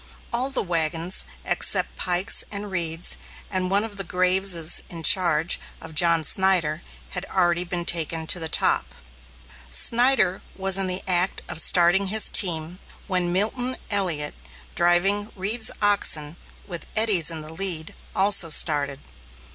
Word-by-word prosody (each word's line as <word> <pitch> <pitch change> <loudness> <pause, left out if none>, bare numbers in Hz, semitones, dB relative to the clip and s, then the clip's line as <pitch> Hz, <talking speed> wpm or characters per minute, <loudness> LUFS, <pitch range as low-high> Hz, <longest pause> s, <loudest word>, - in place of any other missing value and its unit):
All 250 +3 0
the 270 - -1
wagons, 165 0 -1 0.2
except - - 0
Pike's 180 +1 +1
and 205 -1 -7
Reed's, 170 -2 -3 0.3
and 185 -1 -2
one 200 +2 +1
of 205 -3 -9
Graves's 180 -2 +1
in 165 -2 -8
charge 165 -2 +4 0.2
of 160 -1 -12
John 165 0 +3
Snyder, 170 -2 +1 0.3
had 180 - -3
already 175 -2 0
been 175 -1 -4
taken 165 -1 -1
to 180 +2 0
the 160 -1 -3
top. - - 0 0.7
Snyder 230 - +3
was 195 0 +1
in 190 - +1
the 185 +1 0
act 180 0 0
of 160 - 0
starting 180 +3 +5
his 215 +3 +1
team, 170 -1 +1 0.3
when 180 -3 -1
Milton 245 +7 -1
Elliot, 170 -7 -2 0.4
driving 195 +5 +1
Reed's 210 +4 -2
oxen, 160 -7 +1 0.3
with 175 -4 -8
Eddy's 210 -7 +3
in 160 -2 -6
the 155 +1 -11
lead, 165 -3 -2 0.2
also 195 -3 +4
started. 145 -3 +2
180 Hz, 140 wpm, -23 LUFS, 165-195 Hz, 0.7 s, starting